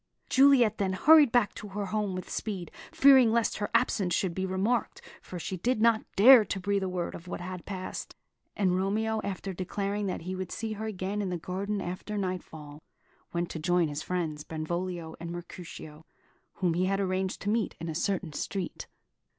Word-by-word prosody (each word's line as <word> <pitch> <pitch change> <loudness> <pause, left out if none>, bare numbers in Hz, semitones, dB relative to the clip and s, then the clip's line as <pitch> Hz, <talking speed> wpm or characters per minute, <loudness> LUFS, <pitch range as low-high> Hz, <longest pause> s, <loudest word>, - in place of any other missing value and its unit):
Juliet 260 -5 +5
then 190 -2 0
hurried 295 +6 +6
back 240 -4 +3
to 210 - -8
her 200 +1 -4
home 205 -1 -2
with 185 - -5
speed, 195 -5 -4 0.2
fearing 265 -4 +6
lest 230 0 +1
her 205 - -2
absence 180 -4 +2
should 185 -3 0
be 190 +2 -2
remarked, 200 +6 0 0.2
for 180 - -8
she 185 +2 -4
did 240 +6 0
not 225 0 +4
dare 240 +3 +9
to 200 -1 -4
breathe 200 +1 0
a 190 - -1
word 180 -1 -3
of 170 - -10
what - - -5
had 180 0 -7
passed; 185 -2 -6 0.4
and 185 -3 +2
Romeo, 215 +4 0
after 195 0 -4
declaring 200 +3 -2
that 185 - -3
he 180 +3 -5
would 185 -1 -5
see 220 -1 -3
her 215 +1 -5
again 200 0 -3
in 195 - -2
the 180 - -2
garden 195 +4 -3
after 185 +4 -5
nightfall, 160 -6 -5 0.5
went 170 0 -2
to 160 - -5
join 175 0 +2
his 145 +1 -4
friends, 160 -5 -3
Benvolio 170 +1 -4
and 170 0 -6
Mercutio, 170 -3 -9 0.5
whom 180 -3 +1
he 180 +2 +1
had 195 +1 0
arranged 190 -1 -1
to 205 - -1
meet 225 -2 0
in 165 - -5
a 160 - -3
certain 175 -1 -2
street. 190 +4 -4
190 Hz, 190 wpm, -29 LUFS, 175-210 Hz, 0.5 s, dare